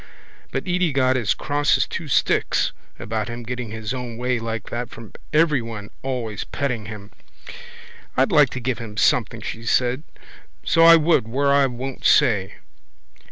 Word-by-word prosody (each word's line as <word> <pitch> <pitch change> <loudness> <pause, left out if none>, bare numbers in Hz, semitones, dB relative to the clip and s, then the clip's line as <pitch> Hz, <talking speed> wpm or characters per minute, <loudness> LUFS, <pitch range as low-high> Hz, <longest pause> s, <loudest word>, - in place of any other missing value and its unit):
But - - -2
Edy 180 -2 +1
got 130 -1 +2
as 115 -6 +1
cross 145 -1 +1
as - - +2
two - - -6
sticks - - +1 0.3
about 110 -1 -3
him 120 0 -6
getting 125 -1 -5
his 110 +2 -5
own 125 -3 -6
way 125 0 -1
like 115 -2 -5
that 120 +1 -3
from 115 -2 -12 0.2
everyone 120 -10 0
always 120 -6 -3
petting 125 -7 -3
him. 105 -1 -9 1.1
—I'd 130 +1 +3
like 145 -3 +5
to - - -2
give 125 -2 -2
him 110 -3 -8
something, - - +2
she 115 - -6
said, 125 +3 +1 0.6
so 165 - +2
I 165 0 +10
would, 160 -7 +3
where 140 +4 +1
I 140 -1 +4
won't 130 +1 -6
say. 105 -10 +3
125 Hz, 160 wpm, -22 LUFS, 115-140 Hz, 1.1 s, I